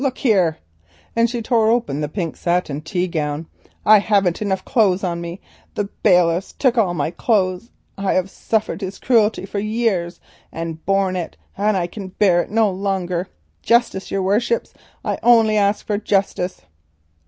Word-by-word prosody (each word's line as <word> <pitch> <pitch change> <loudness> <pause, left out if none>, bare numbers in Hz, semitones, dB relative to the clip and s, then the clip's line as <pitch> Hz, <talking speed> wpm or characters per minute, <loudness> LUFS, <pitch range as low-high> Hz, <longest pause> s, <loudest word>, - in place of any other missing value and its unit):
Look 265 -2 -1
here," 190 - +2 0.6
and 230 0 +3
she 240 -1 -4
tore 225 -2 +2
open 190 - 0
the 150 - -2
pink 170 -1 -3
satin 170 -5 -1
tea 175 +4 -2
gown, 150 -2 -3 0.4
"I 215 0 +8
haven't 200 -4 +1
enough 190 -2 -1
clothes 200 -7 +2
on 170 -2 -2
me; 170 +2 -7 0.3
the 205 -1 -2
bailiffs 175 0 +3
took 260 -4 +1
all 195 -7 +2
my 155 0 -1
clothes; 190 0 0 0.3
I 195 -1 0
have 185 +1 0
suffered 215 -4 -2
his 195 0 -5
cruelty 220 -5 +2
for 200 +1 -4
years, 215 -5 -1 0.3
and 165 -1 -6
borne 195 -1 +2
it, 175 -2 -5 0.2
and 205 0 +1
I 175 - 0
can 195 +2 -7
bear 185 -2 +2
it - - -7
no 220 0 +3
longer. 185 -2 -2 0.3
Justice, 235 -5 +1
your 195 -1 -1
worships; 225 +5 0 0.3
I - - -1
only 225 -3 +5
ask 205 0 +1
for 205 -1 -1
justice." 195 -3 -1
195 Hz, 165 wpm, -20 LUFS, 175-215 Hz, 0.6 s, I